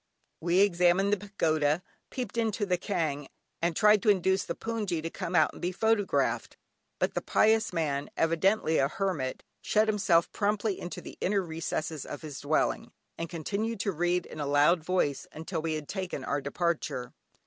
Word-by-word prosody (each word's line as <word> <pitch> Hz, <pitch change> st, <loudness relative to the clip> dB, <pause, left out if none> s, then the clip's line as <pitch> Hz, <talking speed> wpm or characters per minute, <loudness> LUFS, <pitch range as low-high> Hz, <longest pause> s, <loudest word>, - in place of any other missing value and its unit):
We 175 Hz, +3 st, +3 dB
examined 185 Hz, +1 st, +3 dB
the -, -, +3 dB
pagoda, 160 Hz, -5 st, 0 dB, 0.3 s
peeped 255 Hz, -3 st, -5 dB
into 225 Hz, -2 st, 0 dB
the 180 Hz, -2 st, +2 dB
kyaung, 155 Hz, -8 st, -2 dB, 0.3 s
and 170 Hz, 0 st, +1 dB
tried 210 Hz, +2 st, +5 dB
to 215 Hz, -, +2 dB
induce 190 Hz, -1 st, +3 dB
the -, -, -4 dB
hpoongyi 210 Hz, -8 st, -2 dB
to 165 Hz, -, -3 dB
come 170 Hz, -, -4 dB
out -, -, +4 dB
and -, -, -12 dB
be 180 Hz, -, -1 dB
photographed; 220 Hz, +1 st, +1 dB, 0.4 s
but -, -, 0 dB
the -, -, -1 dB
pious 220 Hz, +1 st, +3 dB
man, 150 Hz, -5 st, -1 dB
evidently 165 Hz, +1 st, +2 dB
a 135 Hz, -, +3 dB
hermit, 155 Hz, -6 st, -2 dB, 0.2 s
shut 215 Hz, +1 st, +2 dB
himself 195 Hz, -6 st, +3 dB
promptly 205 Hz, -1 st, 0 dB
into 175 Hz, -, -6 dB
the -, -, -11 dB
inner 195 Hz, 0 st, +1 dB
recesses 160 Hz, -2 st, -3 dB
of -, -, -8 dB
his 150 Hz, -3 st, -6 dB
dwelling, 155 Hz, +10 st, 0 dB, 0.3 s
and 165 Hz, 0 st, -3 dB
continued 200 Hz, +7 st, -3 dB
to 200 Hz, -, 0 dB
read 175 Hz, +1 st, 0 dB
in 155 Hz, -, -10 dB
a 145 Hz, -, -2 dB
loud 150 Hz, +4 st, +4 dB
voice 160 Hz, -5 st, 0 dB
until 160 Hz, +1 st, -4 dB
we 160 Hz, 0 st, -1 dB
had 155 Hz, -2 st, -5 dB
taken 185 Hz, -8 st, -4 dB
our 145 Hz, +2 st, -1 dB
departure. 140 Hz, -4 st, -2 dB
175 Hz, 175 wpm, -29 LUFS, 155-205 Hz, 0.4 s, tried